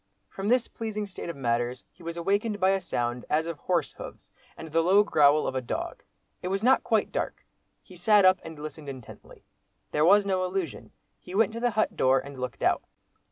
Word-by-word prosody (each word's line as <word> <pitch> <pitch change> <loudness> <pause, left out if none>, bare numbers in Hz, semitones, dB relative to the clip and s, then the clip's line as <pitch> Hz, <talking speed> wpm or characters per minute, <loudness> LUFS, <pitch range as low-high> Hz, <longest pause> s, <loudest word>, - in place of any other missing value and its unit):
From 195 +1 -5
this 245 +1 +3
pleasing 215 -2 -4
state 185 -3 -7
of 170 - -5
matters, 120 -1 -1
he - - -22
was 170 0 -6
awakened 205 +4 0
by 190 0 +4
a 195 0 +1
sound 120 -4 -2
as 155 +2 +2
of 165 -3 -5
horse 175 -5 0
hoofs - - -11 0.3
and 160 -1 -9
the 165 +1 +3
low 190 +5 +5
growl 150 -6 +4
of - - -2
a 130 - -1
dog. 120 - -4 0.4
It - - -4
was 195 +2 -1
not 260 +2 +4
quite - - +1
dark. - - -4 0.4
He 185 - -15
sat 200 +3 +4
up 185 0 +6
and 160 -1 -9
listened 150 -1 -8
intently. 130 -4 -11 0.5
There 150 - +2
was 200 +4 +6
no 190 -2 0
illusion. 185 -4 -3 0.3
He 180 - -9
went 220 +1 +3
to 230 - -4
the 245 +1 +2
hut 215 -1 0
door 130 +1 +4
and 135 0 -6
looked 125 -1 -5
out. - - +3
175 Hz, 210 wpm, -27 LUFS, 145-200 Hz, 0.5 s, up